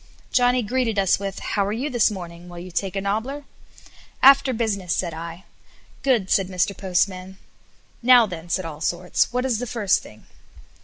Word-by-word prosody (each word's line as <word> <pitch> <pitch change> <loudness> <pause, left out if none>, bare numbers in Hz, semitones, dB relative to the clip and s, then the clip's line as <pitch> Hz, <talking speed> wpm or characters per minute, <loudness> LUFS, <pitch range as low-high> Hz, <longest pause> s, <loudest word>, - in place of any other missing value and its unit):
Johnny 245 0 +3
greeted 230 0 -1
us 195 -2 +3
with, 195 -1 -5
"How 200 - -1
are 200 - -2
you 240 +7 -2
this 240 -6 +2
morning? 175 -3 -8
Will 175 - -10
you 180 +1 -8
take 190 +2 -2
a 195 - -1
nobbler?" 220 +9 -2 0.8
"After 275 0 +7
business," 210 -7 -1
said 170 -3 -2
I. 165 +2 -8 0.6
"Good," 240 -8 +1
said 195 -2 +3
Mr. 185 +1 -1
Postman. 185 0 -1 0.6
"Now, 245 -1 +7
then," 175 -4 -8
said 185 +1 -1
Allsorts, 170 +3 -1
"what 250 +1 -1
is 240 -4 0
the 250 - -4
first 215 -4 +1
thing?" 110 - -15
200 Hz, 170 wpm, -23 LUFS, 180-240 Hz, 0.8 s, After